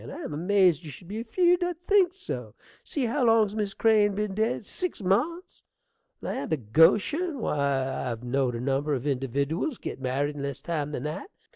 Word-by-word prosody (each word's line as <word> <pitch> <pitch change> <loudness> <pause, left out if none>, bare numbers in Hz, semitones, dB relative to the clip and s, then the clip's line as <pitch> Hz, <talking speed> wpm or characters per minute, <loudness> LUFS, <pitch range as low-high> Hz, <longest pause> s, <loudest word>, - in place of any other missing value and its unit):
I 295 - -8
am - - -5
amazed 180 0 +3
you 155 - -8
should 170 +5 -11
be 215 +4 -4
afeerd 350 +8 +3
I'd 350 -1 -3
think 390 -3 +4
so. 125 - -7 0.3
See 280 -4 -2
how 255 +4 0
long's 225 -3 +4
Miss 205 -2 -2
Crane 210 -3 +3
been 210 -1 -2
dead? 220 +2 -1
Six 360 - -4
months! 300 - 0 0.6
land - - -4
o' 160 - +2
Goshen! 190 - +3
why, 140 - -1
I've 115 0 -5
know'd 125 0 0
a - - -3
number 140 +3 0
of 130 - -4
individdiwals 140 - -1
get - - -6
married 140 +3 -1
in 145 - -6
less 140 -1 -4
time 150 -1 -3
than 135 - -4
that. 150 - -5
180 Hz, 185 wpm, -27 LUFS, 140-235 Hz, 0.6 s, think